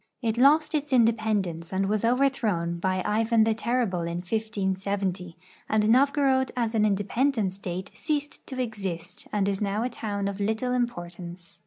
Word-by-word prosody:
It 225 -1 +1
lost 300 +5 +5
its 295 -1 -1
independence 215 -8 +1
and 195 +1 0
was 210 +1 0
overthrown 230 -9 +1
hy 185 -1 +1
Ivan 225 +1 +3
the 225 0 +2
Terrible 225 -5 0
in 170 0 -3
1570, 190 -3 -2 0.3
and 215 -1 +2
Novgorod 270 0 +3
as 230 -2 0
an 215 -1 +3
independent 205 +1 +1
State 190 0 -6
ceased 295 -2 -3
to 260 -2 -6
exist 195 -7 -5
and 200 -2 +1
is 195 0 -1
now 205 +2 0
a 250 - -1
town 205 -4 -3
of 200 0 -4
little 220 +5 0
importance. 175 -7 -4
215 Hz, 155 wpm, -26 LUFS, 190-240 Hz, 0.3 s, lost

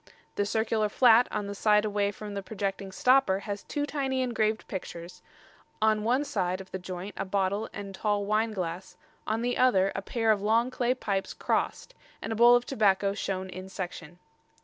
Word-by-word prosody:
The 205 - -1
circular 220 0 0
flat 240 +1 +5
on 205 - -3
the 200 - -5
side 210 +1 +3
away 205 -1 0
from 205 +1 -7
the 200 - -3
projecting 195 -1 -4
stopper 250 -3 +3
has 205 -1 -5
two 290 -1 -3
tiny 270 -3 -1
engraved 220 -3 -1
pictures; 180 -1 -7 0.6
on 215 -1 +2
one 250 +5 +2
side 185 -8 -1
of 190 -1 -11
the 190 - -4
joint 185 +2 -6
a - - -1
bottle 200 +2 -1
and 200 -1 -7
tall 205 0 -1
wine 215 +2 +1
glass, 180 -2 -5 0.3
on 220 +2 -1
the 245 0 -1
other 195 -7 +4
a 195 - -3
pair 225 +2 +1
of 205 -2 +1
long 230 +4 +2
clay 250 0 0
pipes 195 -6 -3
crossed, - - -2 0.3
and 225 - -4
a - - -4
bowl 240 +2 +7
of 245 0 +1
tobacco 200 -5 +2
shown 190 -2 -3
in 185 +1 -8
section." 175 -3 -7
205 Hz, 190 wpm, -28 LUFS, 190-225 Hz, 0.6 s, bowl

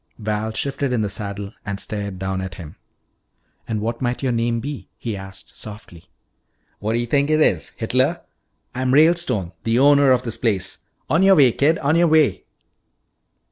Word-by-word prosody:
Val 110 0 -2
shifted 140 +3 -2
in 120 -3 +1
the 105 - -1
saddle 100 +1 -5
and 100 -1 -4
stared 100 -3 -5
down 95 0 -3
at 95 -2 -6
him. 80 -4 -10 0.9
"And 110 -2 -2
what 115 +3 -3
might 125 +1 -2
your 130 - +1
name 115 0 0
be?" 140 +3 -6
he 115 -3 -4
asked 95 -1 -10
softly. 105 -6 -11 0.7
"What 110 +2 -2
d'yuh 120 +1 0
think 140 +4 +1
it 155 0 +3
is? 90 - +2
Hitler? - - 0 0.5
I'm 130 +1 0
Ralestone, 155 - +3
the 115 +1 +1
owner 140 +1 +5
of 130 -1 +3
this 115 -2 -4
place. 100 -5 -2 0.3
On 165 - +2
your 195 0 +6
way, 135 -6 +6
kid, 150 +7 +2
on 145 +3 +1
your 170 +1 +4
way." 155 -3 +3
115 Hz, 175 wpm, -21 LUFS, 100-140 Hz, 0.9 s, your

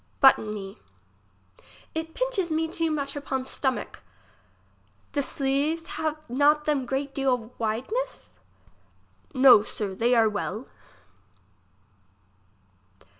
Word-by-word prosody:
Button 265 -6 +5
me. 195 -2 -7 1.1
It 320 0 -5
pinches - - 0
me 320 +1 0
too 330 0 -1
much 280 -2 -2
upon 265 -2 -3
stomack. 265 -1 -3 1.1
The 285 - 0
sleeves 280 +4 -1
have 315 -6 -2
not 290 +4 +3
them 280 -4 0
great 275 +2 -2
deal 250 -4 -1
wideness? 260 - -3 1.0
No, 255 -4 +8
sir, 205 -2 -4
they 235 +5 +2
are 225 -1 +5
well. 210 +2 -3
275 Hz, 100 wpm, -26 LUFS, 240-310 Hz, 1.1 s, No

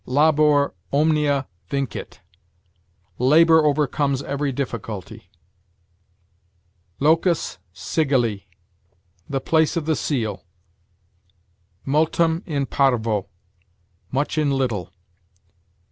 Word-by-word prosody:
Labor 150 +1 +3 0.2
omnia 145 -2 +2 0.2
vincit: 140 -5 -4 1.0
labor 160 +5 +5
overcomes 145 -2 +1
every 140 0 -2
difficulty. 115 -7 -6 1.7
Locus 165 +4 +1
sigilli: 120 - -1 0.8
the 135 - -1
place 160 +4 +1
of 160 - -2
the 160 0 +1
seal. 110 - -2 1.4
Multum 160 +3 +1
in 145 -4 -1
parvo: 115 -8 +1 0.8
much 145 +3 -1
in 150 -2 +1
little. 125 -9 -1
140 Hz, 75 wpm, -22 LUFS, 130-155 Hz, 1.7 s, labor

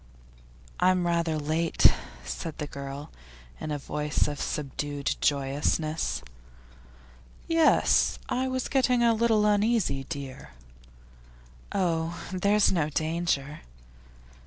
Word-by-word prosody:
'I'm 185 -1 +3
rather 170 -2 +1
late,' 155 +2 +3 0.3
said 150 - -5
the 150 - -3
girl, 140 0 -7 0.5
in - - -5
a 150 - -1
voice 150 +1 -1
of 145 -1 -4
subdued 145 0 -3
joyousness. 145 - 0 1.2
'Yes; 330 -1 +4
I 260 +1 0
was 260 -1 -2
getting 250 -3 +2
a 230 -1 +5
little 220 -2 +3
uneasy, 205 - +2
dear.' 135 - -7 1.2
'Oh, 170 -3 -1
there's 200 +2 +3
no 160 -5 +1
danger. 155 -2 -1
160 Hz, 100 wpm, -27 LUFS, 145-205 Hz, 1.2 s, a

